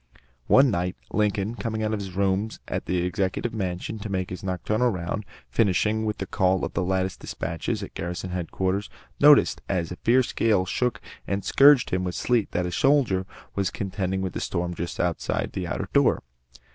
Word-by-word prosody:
One 135 -1 +6
night, 90 -1 -1 0.2
Lincoln, 105 0 +1
coming 110 0 -3
out 110 0 0
of 105 - -1
his 95 -2 -6
rooms 100 +3 0
at - - -3
the 90 -1 0
Executive 95 +4 -1
Mansion 95 +1 -3
to 105 - -6
make 95 -2 -2
his 90 0 -6
nocturnal 105 +6 0
round, 95 +1 -3 0.3
finishing 110 +1 +2
with 105 -1 -1
the 95 - -3
call 95 0 +2
for - - -1
the - - -2
latest 95 0 -1
despatches 85 -2 -3
at - - -8
garrison 90 +2 -4
headquarters, 95 +3 -2 0.3
noticed 145 0 +6
as 90 -4 0
the 90 - -6
fierce 125 +2 +2
gale 105 -5 +2
shook 125 +5 0
him - - -28 0.2
and 100 0 -2
scourged 140 -2 +6
him 95 0 0
with 90 -2 -3
sleet, 120 -4 +1
that 90 - 0
a 90 - -3
soldier 110 -5 +2 0.3
was 100 -2 0
contending 95 -1 -2
with 95 - -3
the - - -4
storm 90 -1 -2
just 85 0 -5
outside 85 -2 -1
the - - -4
outer - - -3
door. - - +3
95 Hz, 190 wpm, -25 LUFS, 90-110 Hz, 0.3 s, One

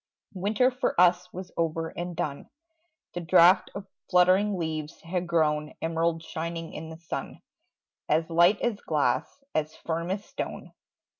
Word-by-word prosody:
Winter 210 +7 +2
for 250 -7 -1
us 180 0 +4
was 185 0 -8
over 165 0 -1
and 175 0 -5
done: 150 -4 -4 0.6
The 175 - -3
drought 175 +2 +5
of 200 -1 -6 0.2
fluttering 185 +3 +4
leaves 155 -2 -4
had 175 +1 -3
grown 150 -3 +1
Emerald 165 0 0
shining 165 0 -5
in 160 - -7
the 160 - -9
sun, 165 0 -6 0.7
As 160 +2 +2
light 175 +4 +4
as 225 -4 -1
glass, 150 - -1
as 155 0 -1
firm 170 +1 -3
as 200 +2 -3
stone. - - -6
170 Hz, 145 wpm, -27 LUFS, 160-185 Hz, 0.7 s, drought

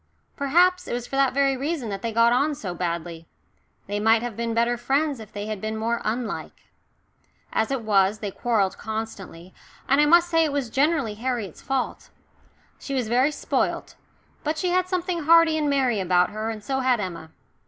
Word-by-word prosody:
Perhaps 355 +6 +2
it - - -3
was 240 0 -3
for 270 - -6
that 275 -1 +3
very 275 0 +2
reason 275 -2 -3
that 195 -1 -4
they 230 - -2
got 230 +1 +4
on 285 +4 +1
so 190 -10 -5
badly 170 -2 -4 0.6
they 205 +1 -3
might 225 +2 +3
have 240 -3 -4
been 230 +1 -2
better 235 +1 +2
friends 275 +3 0
if 220 -2 -11
they 205 0 -5
had 215 -2 -5
been 220 0 -3
more 230 +2 -1
unlike. 230 +2 -4 0.8
As 220 - +1
it 270 -4 -2
was, 200 -1 +3
they 210 -2 -5
quarrelled 210 -4 0
constantly, 205 -5 -6 0.3
and 275 +2 +4
I 295 - +4
must 345 +2 +6
say 330 -1 +3
it 310 - 0
was 275 -5 -2
generally 280 -4 +1
Harriet's 225 -5 -4
fault. 270 -2 -3 0.7
She 275 - -5
was 245 -4 -1
very 255 +5 +3
spoilt, - - -2 0.5
but 310 +1 -1
she 360 +3 0
had 365 0 +2
something 360 -3 -2
hearty 330 0 +6
and 300 -2 0
merry 260 -6 +1
about 180 -1 +2
her, 215 +1 -3
and 215 -2 -6
so 265 +5 -1
had 255 -3 +2
Emma. 170 -5 -5
240 Hz, 195 wpm, -24 LUFS, 215-285 Hz, 0.8 s, must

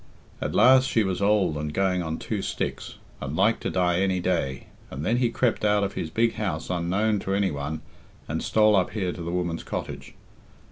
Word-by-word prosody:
At - - -2
last 130 +1 +6
she 115 - +2
was 95 -1 -2
old 100 -6 +2
and 75 0 -3
going 95 +1 +1
on 80 -1 -3
two 105 -3 -3
sticks, - - -4 0.3
and 70 +2 -4
like 105 +6 +3
to - - -3
die 90 -1 +1
any 95 -1 +1
day, 85 -7 -1 0.2
and 70 +3 -5
then 115 - +2
he 125 -1 +2
crept 120 -1 0
out 105 -1 +3
of 100 - -2
his 80 - -4
big 115 +6 +1
house 105 -3 -3
unknown 95 +5 +1
to 95 0 -2
any 100 -2 +1
one 75 +2 -4 0.5
and - - -2
stole 110 -1 +4
up 95 -2 +2
here 95 -5 -1
to 90 - -8
the 85 - -4
woman's 85 -2 -2
cottage. - - -6
95 Hz, 205 wpm, -25 LUFS, 85-105 Hz, 0.5 s, last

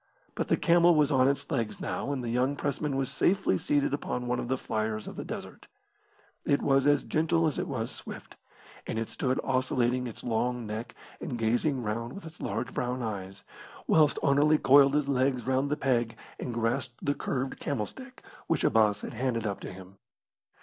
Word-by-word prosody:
But - - -2
the - - +2
camel 170 0 +5
was 150 -1 +3
on 130 -1 +4
its 140 +3 -1
legs 115 -7 -1
now, - - -3
and 135 -3 -2
the 115 - -2
young 130 +4 +1
pressman 145 0 -2
was 135 -1 -1
safely 185 - +2
seated 145 -1 +1
upon 125 -3 -2
one 125 0 0
of - - -3
the 130 +2 0
fliers 110 -2 -2
of - - -7
the - - -5
desert. - - -8 0.8
It 140 - +2
was 135 0 +3
as 145 -1 +4
gentle 165 +1 +1
as 155 - 0
it - - -2
was 115 -4 -3
swift, - - -9 0.5
and - - -3
it 115 0 -2
stood 130 -1 -1
oscillating 130 -1 +1
its 115 - -9
long 120 +1 -1
neck 110 +3 -5 0.2
and 135 -8 -4
gazing 120 +4 +1
round 115 +3 -3
with 195 - -9
its 160 +1 -11
large - - -3
brown 125 0 -2
eyes, 95 -3 -5 0.4
whilst 155 -2 +4
Anerley 145 +2 +4
coiled 140 0 +6
his 150 -2 +1
legs 130 -2 +1
round 130 +2 +1
the 150 - 0
peg 120 -4 0 0.2
and 125 - -4
grasped 120 +2 -2
the 145 - +2
curved 130 -1 -3
camel 130 -8 -1
stick 260 - -12 0.2
which - - +1
Abbas 105 -2 +3
had - - -6
handed 120 -2 -1
up 100 -2 -2
to - - -7
him. 95 +1 -12
130 Hz, 195 wpm, -29 LUFS, 115-145 Hz, 0.8 s, coiled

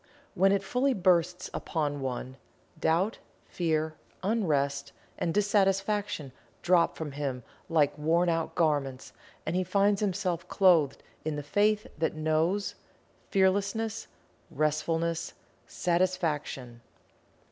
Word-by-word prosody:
When 195 0 +4
it 200 -1 +2
fully 255 +6 +1
bursts 180 -2 +2
upon 145 -3 -2
one, 130 0 -4 0.4
Doubt, 175 +8 +1 0.3
Fear, 160 -2 -1 0.3
Unrest 145 -10 0 0.3
and 165 - 0
Dissatisfaction 200 -4 +1 0.3
drop 175 -1 +3
from 155 -3 -5
him 135 -3 -3 0.3
like 155 -4 +3
wornout 165 +1 +1
garments 145 -5 0 0.3
and 160 - -1
he 185 - +2
finds 200 +2 +2
himself 185 -4 -1
clothed 170 -8 +3 0.2
in 155 -1 -2
the 145 - -4
Faith 210 - +2
that 160 -1 0
Knows; 160 +6 0 0.6
Fearlessness; 200 +3 +1 0.4
Restfulness; 160 +3 -1 0.3
Satisfaction. 160 -9 -1
170 Hz, 105 wpm, -29 LUFS, 150-195 Hz, 0.6 s, When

